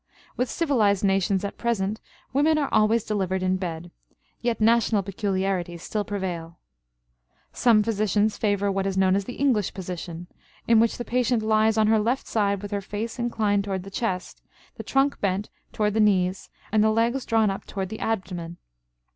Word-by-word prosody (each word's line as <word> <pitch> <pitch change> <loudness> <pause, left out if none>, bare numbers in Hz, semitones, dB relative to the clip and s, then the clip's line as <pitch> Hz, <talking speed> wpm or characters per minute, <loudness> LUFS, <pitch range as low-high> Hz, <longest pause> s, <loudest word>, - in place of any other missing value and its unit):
With 250 +1 -1
civilized 220 - +1
nations 195 0 +1
at 200 - -6
present 215 -2 -1 0.3
women 305 +3 +3
are 285 -3 -1
always 215 +1 +3
delivered 190 -3 -1
in 185 0 +1
bed; 175 -2 -5 0.5
yet 235 -2 -1
national 225 -2 +3
peculiarities 190 -3 -2
still 210 -1 -2
prevail. 175 -5 -5 1.0
Some 225 -4 +4
physicians 210 -1 +1
favor 205 -2 0
what 195 0 -1
is 190 -1 -2
known 190 0 +4
as 200 0 -1
the 245 - -7
English 250 -9 +1
position, 175 -2 -6 0.4
in 230 -1 +5
which 230 0 +2
the 240 - -5
patient 245 -2 +1
lies 220 0 +3
on 215 - +4
her 220 0 +4
left 240 +5 0
side 200 -2 0
with 205 - -6
her 200 -1 -1
face 215 +5 -5
inclined 215 -4 +1
toward 190 -2 -3
the 195 - -10
chest, 190 -4 -3 0.3
the - - -8
trunk 275 +1 +1
bent 195 +1 -1 0.2
toward 210 -1 0
the 220 - 0
knees, 190 -3 +2 0.2
and 215 -1 +4
the 220 - +4
legs 230 +4 +1
drawn 220 -3 +2
up 195 - -6
toward 190 -2 -4
the 220 - -6
abdomen. 180 -6 -3
205 Hz, 175 wpm, -25 LUFS, 190-225 Hz, 1.0 s, in